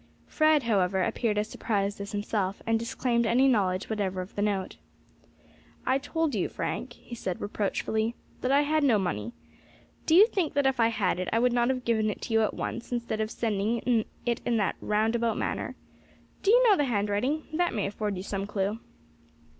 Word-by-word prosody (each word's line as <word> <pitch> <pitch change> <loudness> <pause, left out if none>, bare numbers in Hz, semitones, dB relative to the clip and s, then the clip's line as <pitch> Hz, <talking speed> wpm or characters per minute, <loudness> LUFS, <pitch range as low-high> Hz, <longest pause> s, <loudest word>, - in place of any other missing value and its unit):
Fred, 310 -2 +3
however, 190 -4 +2
appeared 215 +2 0
as 210 +1 0
surprised 200 -2 -2
as 200 - -6
himself, 205 -2 -2
and 225 0 +2
disclaimed 235 0 0
any 255 +4 +4
knowledge 190 -7 +1
whatever 200 -4 -2
of 185 - -9
the 205 - -3
note. 200 -2 -1 1.1
"I 265 +1 +2
told 325 0 -1
you, 200 -5 0
Frank," - - -4
he - - -13
said 185 -6 -4
reproachfully, 220 +2 -1 0.3
"that 255 - 0
I 280 +1 +5
had 305 +1 +1
no 250 -6 +4
money. 120 - -2 0.8
Do 320 - +5
you 395 +4 +9
think 375 -10 -2
that 285 -1 +2
if 265 -1 +2
I 230 - +5
had 200 -6 0
it 185 - -2
I - - +2
would 245 +1 +3
not 240 0 +2
have 255 -1 -2
given 220 -2 +2
it 210 - -4
to - - -4
you 225 - +4
at 215 - 0
once, 235 - -5
instead 235 -2 -2
of 215 - -1
sending 225 +1 0 0.2
it 240 -1 0
in 235 -1 +1
that 195 -5 0
roundabout 225 +2 +1
manner? - - -3 0.7
Do 390 - +1
you - - +6
know 415 - +7
the 290 - +1
handwriting? 225 +6 0
that 350 +2 +1
may 205 - 0
afford 205 0 -3
you 185 - -5
some 195 0 -3
clue." 205 +1 -2
225 Hz, 195 wpm, -28 LUFS, 205-250 Hz, 1.1 s, you